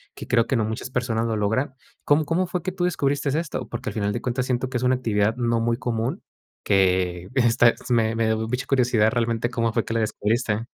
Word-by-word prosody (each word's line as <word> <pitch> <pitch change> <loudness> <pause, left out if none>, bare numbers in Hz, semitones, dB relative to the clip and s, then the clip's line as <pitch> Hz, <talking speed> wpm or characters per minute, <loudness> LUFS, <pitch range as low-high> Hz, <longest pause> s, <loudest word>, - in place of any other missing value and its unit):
que - - -9
creo 115 -2 +3
que 130 - 0
no 110 - +1
muchas 110 +3 -4
personas 120 -3 -1
lo 110 -1 -1
logran 110 +6 0 0.3
¿cómo 150 +1 +3
cómo 165 +5 +1
fue 180 0 -3
que 185 - -2
tú 180 -1 -3
descubriste 145 -5 0
esto? 165 -1 -3
Porque 120 +2 -4
al - - -7
final 100 -2 -1
de 120 - -3
cuentas 125 0 -1
siento 125 0 0
que 130 - -9
es 120 - -3
una 125 +1 +3
actividad 110 -3 0
no 115 -2 +1
muy 115 0 +1
común, 115 0 -2 0.4
que 90 -2 +1
esta 120 -2 +4 0.2
me 115 -2 +2
me 115 -1 +1
da 110 - +2
mucha 110 +4 -2
curiosidad 120 -5 +2
realmente 115 -1 0
cómo 115 -1 0
fue - - 0
que - - -4
la 115 - +1
descubriste. 110 +1 -1
120 Hz, 230 wpm, -24 LUFS, 110-130 Hz, 0.4 s, esta